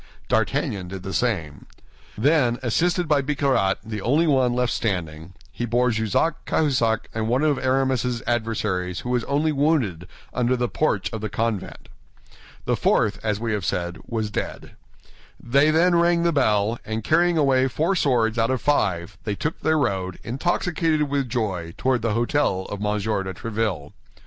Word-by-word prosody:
D'Artagnan 95 -3 0
did 95 0 -7
the 95 -1 -5
same. 85 - -2 0.5
Then, 125 -1 +3
assisted 175 +8 +1
by 145 -2 +3
Bicarat, 135 -8 +1
the 110 -2 -5
only 145 +10 +2
one 130 -5 +3
left 125 0 0
standing, 85 -5 -3 0.3
they 120 - 0
bore 120 +1 +2
Jussac, 110 - 0
Cahusac, 125 -8 +1
and 110 0 -2
one 125 +5 +1
of 150 -3 +2
Aramis's 130 -2 0
adversaries 105 -6 -1
who 125 - -4
was 125 -2 +1
only 150 +3 +1
wounded, 135 - 0 0.3
under 125 0 +1
the 120 0 0
porch 115 -8 -1
of 110 - -4
the 110 - -3
convent. 110 -2 -3 0.8
The - - +1
fourth, 105 -2 +1
as 105 -2 -1
we 115 -1 -2
have 105 -3 -2
said, 90 +2 -2
was 110 -2 -2
dead. - - -5 0.7
They 140 +5 +3
then 170 +3 +4
rang 170 0 +3
the 170 -1 +2
bell, 110 -4 +2
and 110 0 -4
carrying 170 +4 +3
away 135 -3 +3
four 160 +8 0
swords 120 -8 +1
out 115 - +2
of 130 -1 0
five, 95 -10 0
they 105 - -2
took 150 +9 -3
their 160 0 +2
road, 95 -9 -1
intoxicated 160 - 0
with 140 -3 0
joy, 95 -9 -3
toward 130 -3 +1
the 110 -1 0
hôtel 120 -6 +1
of 100 - -4
M. 105 0 0
de 100 -2 -2
Tréville. 105 -10 -3
120 Hz, 165 wpm, -23 LUFS, 105-140 Hz, 0.8 s, then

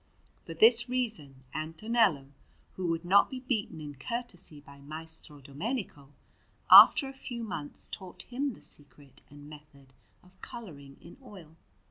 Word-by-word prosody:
For 165 - -10
this 235 +6 +5
reason 190 - -3
Antonello, 160 - 0 0.4
who 185 -1 -3
would 165 0 -2
not 200 +3 +5
be 260 - -6
beaten 225 -10 -3
in 150 -1 -8
courtesy 180 - -6
by 140 -1 -16
Maestro 155 0 -8
Domenico, 145 - -5 0.6
after 275 - +10
a 270 - -8
few 245 -3 -6
months 155 -9 -5
taught 185 -2 -9
him 270 +2 -3
the - - -17
secret 145 -2 -8
and 145 0 -14
method 145 -3 -16 0.3
of 185 +1 -22
colouring 150 - -10
in 170 - -14
oil. 180 -10 -14
165 Hz, 140 wpm, -29 LUFS, 145-230 Hz, 0.6 s, after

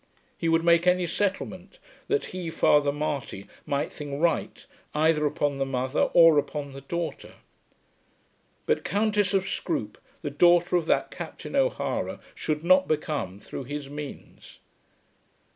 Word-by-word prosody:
He 165 - -1
would 165 0 +3
make 170 +1 +4
any 180 0 +4
settlement 190 0 -3 0.3
that 430 0 +1
he, 180 -2 -4
Father 150 -3 +3
Marty, 140 -9 -4 0.2
might 140 +1 -1
think 145 -2 -6
right 165 -1 0 0.3
either 155 0 +3
upon 145 -1 -1
the - - +2
mother 130 0 0
or 165 -3 +8
upon 145 -1 -4
the 135 - -9
daughter. 170 +4 -5 1.3
But - - +1
Countess 205 +1 +1
of 195 0 +1
Scroope - - -3 0.2
the 145 - -3
daughter 175 +4 +4
of 170 -2 +1
that - - +1
Captain - - -7
O'Hara - - 0
should 150 0 -3
not 185 +2 +5
become 150 -11 -2
through 130 +5 -8
his 145 +1 -6
means. 145 -1 -9
155 Hz, 140 wpm, -26 LUFS, 145-175 Hz, 1.3 s, or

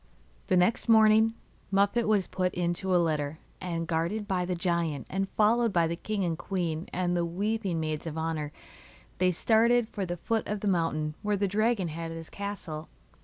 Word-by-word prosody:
The 185 - +3
next 180 +6 +2
morning 220 0 +6 0.4
Muffette 200 +4 +2
was 205 -3 +3
put 185 -1 -2
into 180 +2 0
a - - +6
litter, 155 -3 0 0.2
and, 165 -2 -2
guarded 170 +6 -1
by 185 -3 0
the 180 0 -1
giant 170 -5 -1
and 195 +1 -1
followed 230 +2 +3
by 170 -3 +3
the 165 +1 -1
king 200 +2 -2
and 165 -2 0
queen 170 -2 -3
and 175 -1 0
the 175 - +1
weeping 195 +1 -1
maids 155 0 -3
of 160 0 -5
honour, 160 -2 -2 0.7
they 185 0 +4
started 230 +5 +3
for 205 -3 -4
the 175 0 -3
foot 225 +6 -1
of 210 -1 -3
the 210 - -1
mountain 165 -4 0
where 210 -1 0
the 200 0 +1
dragon 210 -2 +1
had 165 +1 -5
his 165 0 -8
castle. 195 -6 -6
180 Hz, 185 wpm, -28 LUFS, 165-210 Hz, 0.7 s, morning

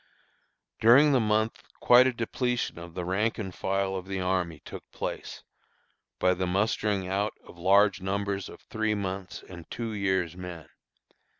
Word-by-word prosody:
During 135 +7 +7
the 135 - +4
month 110 0 +1 0.2
quite 125 +1 +7
a - - +2
depletion 120 -3 -2
of 85 -1 -10
the 90 - -3
rank 105 +5 0
and 95 -4 -5
file 95 +1 -1
of 95 0 -5
the 95 -1 -3
army 90 -4 -1
took - - -9
place, - - -6 0.7
by 90 0 +3
the 95 0 -2
mustering 100 0 0
out 100 +3 -1
of 85 - -14
large 100 +2 +4
numbers 100 0 -2
of - - -12
three 110 -1 -1
months' 95 -2 -5
and 85 -3 -11
two 115 -2 -4
years' 95 -4 0
men. 90 -3 -8
95 Hz, 160 wpm, -28 LUFS, 90-110 Hz, 0.7 s, During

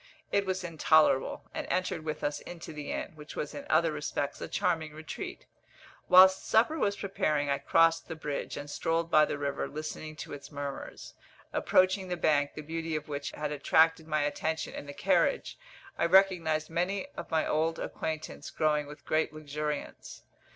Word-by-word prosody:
It 200 -1 +1
was 185 -1 -1
intolerable, 155 -4 +3
and - - -4
entered 180 -3 -1
with 155 -1 -4
us 145 0 -1
into 170 -2 -9
the 150 -1 -6
inn, - - -3
which 150 -1 -11
was 150 - -4
in 145 - -7
other 160 +1 +4
respects 145 -1 -3
a - - -4
charming 160 -4 -1
retreat. 155 0 -7 0.6
Whilst 190 +1 +8
supper 245 +9 +3
was 200 -1 +1
preparing 150 -8 0
I 140 - +1
crossed 165 +3 +3
the 160 - -5
bridge, 150 -2 -4
and 145 - -6
strolled 165 +3 -1
by 155 0 +7
the - - -3
river, 140 -1 -2
listening 155 +1 -6
to 155 - -7
its 140 +1 -9
murmurs. 140 -1 -6 0.4
Approaching 185 +1 +3
the 180 -1 -2
bank, 145 -3 +2
the 155 - -6
beauty 165 +1 -3
of 155 0 -4
which 145 -1 -3
had 150 0 -4
attracted 160 +2 +3
my 155 -1 +1
attention 160 +2 -2
in 145 - -7
the 145 - -7
carriage, - - +1 0.4
I 170 - +3
recognised 170 -4 +4
many 180 +4 -1
of - - -7
my 160 -1 +1
old 160 +1 +1
acquaintance 155 -1 -5
growing 150 -1 +1
with 145 +1 -12
great 155 0 +1
luxuriance. 150 -1 -5
155 Hz, 175 wpm, -30 LUFS, 150-170 Hz, 0.6 s, Whilst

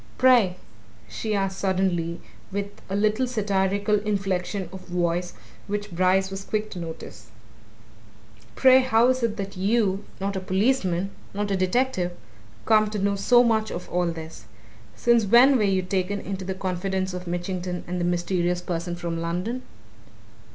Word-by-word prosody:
"Pray," 240 -8 +5 0.5
she 215 -2 -3
asked 195 -1 -1
suddenly, 185 -3 0
and - - -11 0.3
with 200 +1 -5
a 195 - -2
little 215 +5 +2
satirical 205 -2 +1
inflection 195 -2 -2
of 190 - -10
voice 175 0 -1 0.3
which 205 0 -3
Brice 185 +2 +2
was 195 0 -5
quick 215 +1 -2
to 180 - -6
notice, 165 -1 -8 1.3
"pray, 260 0 +7
how 245 -2 +4
is 255 0 +1
it 230 -2 0
that 195 0 -5
you 200 0 +1 0.2
not 195 +1 -2
a - - -1
policeman, 190 -1 0 0.2
not 205 0 -1
a - - +2
detective! 185 -1 0 0.5
come 215 -1 +4
to 210 - -4
know 200 0 +1
so 240 +5 +5
much 220 -2 +1
of 180 - -6
all 180 0 +1
this? 160 -7 -7 0.5
Since 235 - +3
when 245 +7 +6
were 245 - +2
you 190 -2 +1
taken 190 +2 -1
into 190 -1 -5
the 190 0 -3
confidence 190 0 -2
of 180 0 -6
Mitchington 180 0 -3
and 180 0 -3
the - - 0
mysterious 175 0 0
person 175 0 -3
from 170 -1 -4
London?" 180 +9 -2
195 Hz, 160 wpm, -25 LUFS, 180-210 Hz, 1.3 s, pray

